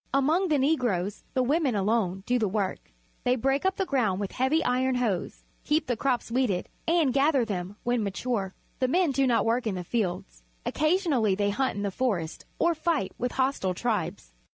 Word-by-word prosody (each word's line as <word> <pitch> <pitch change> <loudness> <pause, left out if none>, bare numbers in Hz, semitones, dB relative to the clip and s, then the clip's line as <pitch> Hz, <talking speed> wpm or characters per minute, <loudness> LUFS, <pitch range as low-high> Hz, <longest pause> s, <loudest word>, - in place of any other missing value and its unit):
Among 315 +8 +3
the 305 -3 +2
Negroes 245 - 0
the 255 - +3
women 280 -2 +1
alone 195 -2 0
do 250 0 +1
the 215 - +1
work. 195 - -3 0.3
They 250 0 +3
break 270 +8 +1
up 380 - 0
the 385 - -1
ground 230 - +1
with 200 -2 -3
heavy 275 +6 +1
iron 255 +1 +1
hoes, 220 -8 -2 0.2
keep 305 +2 +1
the 245 - 0
crops 245 0 -1
weeded, 235 -8 0 0.2
and 325 -6 +3
gather 275 -2 +3
them 190 -2 -4
when 240 -2 +1
matiu'e. 200 -1 -2 0.3
The 255 - +2
men 345 +3 +2
do 270 0 +2
no 235 -2 +3
work 235 +1 +1
in 200 - -1
the 180 - -4
fields. 175 - -3 0.2
Occasion 335 +2 +1
ally 215 -6 +2
they 205 +1 +1
hunt 260 +3 0
in 205 - -3
the 200 - -1
forest 185 -8 -2
or 340 - +3
fight 315 - -1
with 245 0 -2
hostile 260 -9 0
tribes. 210 - -2
245 Hz, 195 wpm, -27 LUFS, 200-275 Hz, 0.3 s, Among